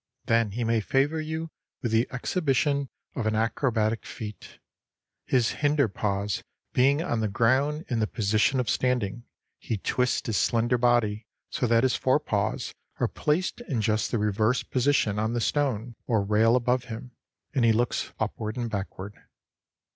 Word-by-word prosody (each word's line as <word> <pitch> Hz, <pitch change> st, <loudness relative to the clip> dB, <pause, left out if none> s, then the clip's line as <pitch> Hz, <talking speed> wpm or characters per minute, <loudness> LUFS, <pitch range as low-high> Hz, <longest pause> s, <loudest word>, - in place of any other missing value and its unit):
Then 115 Hz, -3 st, +2 dB
he 120 Hz, +2 st, -2 dB
may 115 Hz, 0 st, +2 dB
favor 145 Hz, +8 st, +1 dB
you 160 Hz, +1 st, -4 dB, 0.3 s
with 120 Hz, -, -1 dB
the 115 Hz, +2 st, +3 dB
exhibition 140 Hz, -1 st, 0 dB, 0.3 s
of 115 Hz, -4 st, -1 dB
an 110 Hz, -, +1 dB
acrobatic 115 Hz, -1 st, 0 dB
feat: 105 Hz, -1 st, -8 dB, 0.7 s
his 120 Hz, -3 st, +2 dB
hinder 145 Hz, -3 st, +3 dB
paws 100 Hz, 0 st, -2 dB, 0.3 s
being 140 Hz, +5 st, +3 dB
on 120 Hz, -10 st, -1 dB
the 110 Hz, -, +1 dB
ground 130 Hz, +9 st, +1 dB
in 120 Hz, -3 st, -1 dB
the 110 Hz, -, +1 dB
position 110 Hz, +5 st, +1 dB
of 125 Hz, -, -1 dB
standing, 120 Hz, -3 st, 0 dB, 0.3 s
he 115 Hz, -, -3 dB
twists 125 Hz, +5 st, 0 dB
his 110 Hz, -5 st, 0 dB
slender 120 Hz, +6 st, +2 dB
body 115 Hz, -3 st, +2 dB, 0.2 s
so 125 Hz, -, 0 dB
that 115 Hz, 0 st, +4 dB
his 130 Hz, -, +3 dB
forepaws 130 Hz, -7 st, 0 dB, 0.3 s
are -, -, +2 dB
placed 175 Hz, +9 st, -1 dB
in 130 Hz, -6 st, 0 dB
just 110 Hz, 0 st, +1 dB
the -, -, 0 dB
reverse 110 Hz, +3 st, +1 dB
position 125 Hz, -6 st, +1 dB
on 110 Hz, +2 st, 0 dB
the 120 Hz, -, 0 dB
stone 125 Hz, -3 st, 0 dB
or 110 Hz, -5 st, +2 dB
rail 110 Hz, +3 st, +4 dB
above 125 Hz, 0 st, +1 dB
him, 125 Hz, +1 st, -7 dB, 0.4 s
and 130 Hz, -4 st, +2 dB
he 115 Hz, -, +6 dB
looks 120 Hz, +2 st, 0 dB
upward 110 Hz, +2 st, -3 dB
and 120 Hz, -2 st, -3 dB
backward. 100 Hz, 0 st, -5 dB
120 Hz, 160 wpm, -27 LUFS, 110-130 Hz, 0.7 s, he